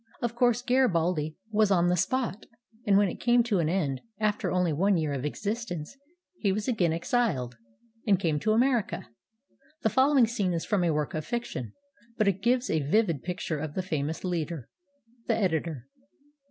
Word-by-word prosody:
Of 235 -1 -2
course, 240 0 +2
Garibaldi 175 - +1
was 215 -1 +3
on 175 -3 +3
the 180 - +3
spot, 220 +3 -1 0.4
and 200 -1 +5
when 205 0 +4
it - - -5
came 240 0 +4
to 215 -5 0
an 160 -2 +1
end, 150 -8 -1 0.2
after 215 -1 0
only 180 -3 +1
one 190 +5 +2
year 155 -3 -1
of 135 0 -3
existence, 200 - -4 0.4
he 200 - +1
was 205 +2 -2
again 195 -10 +2
exiled, 165 - 0 0.5
and 195 -3 +4
came 160 -6 0
to 215 +5 +1
America. 235 - +1 0.7
The 220 - +3
following 265 +1 +4
scene 210 -6 -1
is 165 - -2
from 205 -5 +1
a 170 - +2
work 150 -2 -1
of 155 - -2
fiction, 235 - -4 0.4
but 215 - +2
it 195 -1 +1
gives 250 +1 +2
a 160 - +1
vivid 165 - +1
picture 175 -3 -3
of 150 -1 -5
the 185 - -1
famous 155 -3 -3
leader. 170 -6 -3 0.6
The - - +2
Editor. 160 - -1
185 Hz, 180 wpm, -28 LUFS, 160-225 Hz, 0.7 s, and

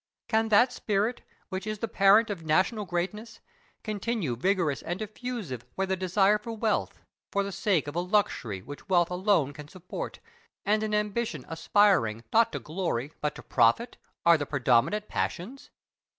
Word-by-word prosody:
Can 220 0 +1
that 240 +4 +5
spirit, 215 +2 -1 0.3
which 190 +1 -4
is 215 0 -2
the 230 - -3
parent 205 +2 +5
of 190 -5 -5
national 185 +7 +1
greatness, 195 +6 -4 0.4
continue 210 - -2
vigorous 170 - 0
and 175 +2 -3
diffusive 215 - -5
where 195 - 0
the 190 0 0
desire 195 +3 +2
of - - -14
wealth, 220 -1 -1 0.3
for 200 - +1
the 200 - -4
sake 190 -5 +1
of 145 - -6
a - - +1
luxury 175 - 0
which 145 +8 -10
wealth 175 -2 +3
alone 180 -6 +2
can 150 0 -10
support, 180 +3 -7 0.5
and 210 +2 +2
an 215 -1 0
ambition 210 - -2
aspiring, 165 - +2
not 230 +1 +5
to - - -3
glory, 155 -5 -3
but 150 -1 -1
to - - -10
profit, 230 - +2 0.3
are 170 -2 +6
the 145 - -3
predominant 140 - +2
passions? 240 +11 -4
195 Hz, 165 wpm, -28 LUFS, 160-215 Hz, 0.5 s, are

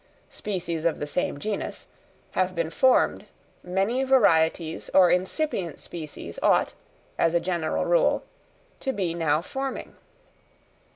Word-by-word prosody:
_, - - -24
species 175 -5 -3
of 170 -1 +1
the - - -3
same 150 0 -1
genus) 210 +5 -4 0.5
have 185 0 0
been 165 -1 -1
formed, 260 +8 +3 0.4
many 195 +8 0
varieties 165 -11 +2
or 180 -2 +7
incipient 185 - -1
species 155 -4 -7
ought, - - +3 0.5
as 165 0 +3
a - - +5
general 170 -3 -1
rule, - - +3 0.6
to 265 - -1
be 185 -6 -1
now 160 -2 +1
forming. 270 +6 -5
180 Hz, 125 wpm, -26 LUFS, 165-210 Hz, 0.6 s, or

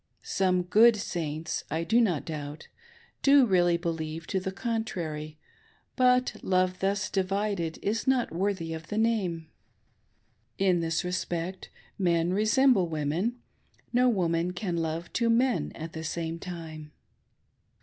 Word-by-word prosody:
Some 185 -2 +1
good 220 +6 +6
Saints, 160 -5 -3
I 160 +2 -1
doubt 195 - +2
not, 150 0 -6 0.5
do 280 -1 +6
really 175 -4 +3
believe 165 -2 -4
to 190 - +2
the 190 +1 -4
contrary, 180 -9 -4 0.6
but 250 -1 +3
love 185 -1 +1
thus 200 +1 0
divided 195 -3 -1
is 220 +5 -1
not 260 -2 +2
worthy 180 -2 -1
of 160 0 -7
the 210 - -4
name. 190 -8 0 1.1
In 185 -3 +3
this 165 +2 -1
respect 180 0 -3 0.3
men 175 -1 +2
resemble 215 -1 +4
women, 165 +10 -2 0.2
— - - -36
no 250 +1 +4
woman 175 -4 0
can 180 -1 -3
love 165 0 -3
two 235 -1 +1
men 245 +2 +2
at 160 +1 -7
the 160 - -6
same 165 +1 -3
time. 160 -4 -8
180 Hz, 130 wpm, -28 LUFS, 165-215 Hz, 1.1 s, good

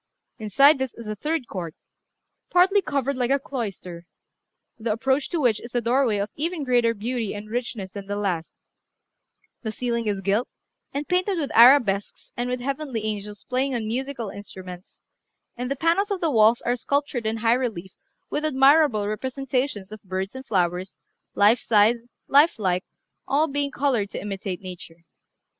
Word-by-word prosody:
Inside 275 +8 +5
this 265 -2 -3
is 230 -2 -9
a 215 - -3
third 300 +3 -2
court, 170 -5 -6 0.7
partly 380 +3 +4
covered 280 -4 -1
like 250 -1 0
a 275 - +4
cloister, 195 -10 -6 0.7
the 225 0 -1
approach 265 +6 0
to 340 - -1
which 240 -7 +2
is 235 +1 -11
a - - +4
doorway 235 -1 +2
of 200 +1 -2
even 325 +1 -2
greater 240 -3 +2
beauty 225 0 -3
and 210 +1 -8
richness 230 -5 -4
than 200 -1 -8
the 205 - -2
last; 185 -5 -2 1.1
the 220 - -3
ceiling 235 -1 -2
is 200 -2 -1
gilt, 200 +5 +1 0.4
and 285 +1 -4
painted 365 +1 +1
with 290 -4 -2
arabesques 230 -5 +5
and 245 +1 -2
with 250 0 -2
heavenly 270 -3 -3
angels 210 -1 -5
playing 260 +1 0
on 230 -2 -2
musical 245 0 -3
instruments, 185 -3 -10 0.5
and 250 +1 -4
the 275 - -1
panels 335 +8 +1
of 400 -2 -1
the 330 -3 0
walls 225 -1 +5
are 245 - 0
sculptured 280 -2 -1
in 220 +1 -1
high 225 +1 +3
relief 220 -8 -3 0.4
with 300 - -1
admirable 275 -6 +4
representations 255 -2 -2
of 215 -1 -9
birds 190 +1 -4
and 260 0 -9
flowers, 180 -2 -1 0.4
life 210 +4 +5
size, 220 +1 +4 0.3
life 290 +4 +5
like, 185 -3 0 0.4
all 300 +3 +2
being 285 -1 -1
coloured 260 -7 0
to - - -5
imitate 195 -2 -5
nature. 175 -3 -10
235 Hz, 165 wpm, -24 LUFS, 205-275 Hz, 1.1 s, Inside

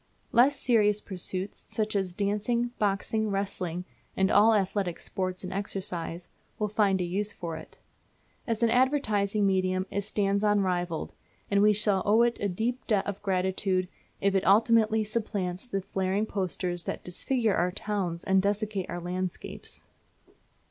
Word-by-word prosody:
Less 265 +5 +4
serious 210 -4 +3
pursuits, 190 0 -5
such 215 -1 -1
as 190 -3 -1
dancing, 215 +4 0
boxing, 210 +2 0
wrestling 185 -3 -2 0.3
and 190 +1 +3
all 220 +2 +6
athletic 195 -3 0
sports 185 -1 -3
and 185 0 -5
exercise, 185 -3 -4 0.3
will 210 - 0
find 200 -2 +2
a - - 0
use 200 +4 -2
for 170 -4 -5
it. 160 - -11 0.7
As 230 -1 -1
an 230 - +4
advertising 215 -6 +2
medium 185 -1 +1
it 200 - -1
stands 200 0 0
unrivalled, 180 -5 0 0.4
and 200 0 +4
we 210 +1 +6
shall 205 -2 +2
owe 220 +3 +4
it 240 0 +1
a 200 - 0
deep 230 +7 -2
debt 210 -4 +2
of 200 -1 -4
gratitude 190 -1 0 0.3
if 200 0 +2
it 195 - +2
ultimately 220 +2 +4
supplants 205 -2 -3
the 195 -5 -2
flaring 190 +2 0
posters 180 -3 -2
that - - -4
disfigure 225 +5 0
our 180 +1 +1
towns 185 -4 -3
and 190 0 +3
desecrate 205 -1 -1
our 175 - -3
landscapes. 180 +1 -5
200 Hz, 150 wpm, -28 LUFS, 185-215 Hz, 0.7 s, all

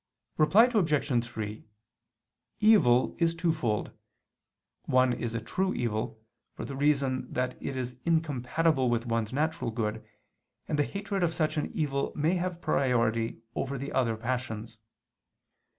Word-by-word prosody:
Reply 185 +9 +6
Obj. 150 - +2
3: 110 -3 -6 1.0
Evil 145 - +5
is 165 -1 +2
twofold. 160 - 0 0.9
One 130 -1 +3
is 115 -1 -3
a - - 0
true 190 +12 -1
evil, 110 -2 -2 0.4
for - - -5
the 140 - -6
reason 140 -2 +1
that 125 0 -1
it 135 - -4
is 125 -1 -4
incompatible 155 -3 +1
with 120 0 0
one's 115 -2 -1
natural 155 -1 -1
good, 110 -1 -2 0.6
and 150 - -1
the 145 - +3
hatred 200 -1 -3
of 170 -2 +1
such 155 -1 0
an 150 - -1
evil 140 -3 -1
may 155 +4 +2
have 180 -1 -2
priority 115 -3 +1
over 140 +1 -2
the 140 +2 -5
other 115 -4 +1
passions. 115 -2 -4
130 Hz, 135 wpm, -29 LUFS, 115-160 Hz, 1.0 s, Reply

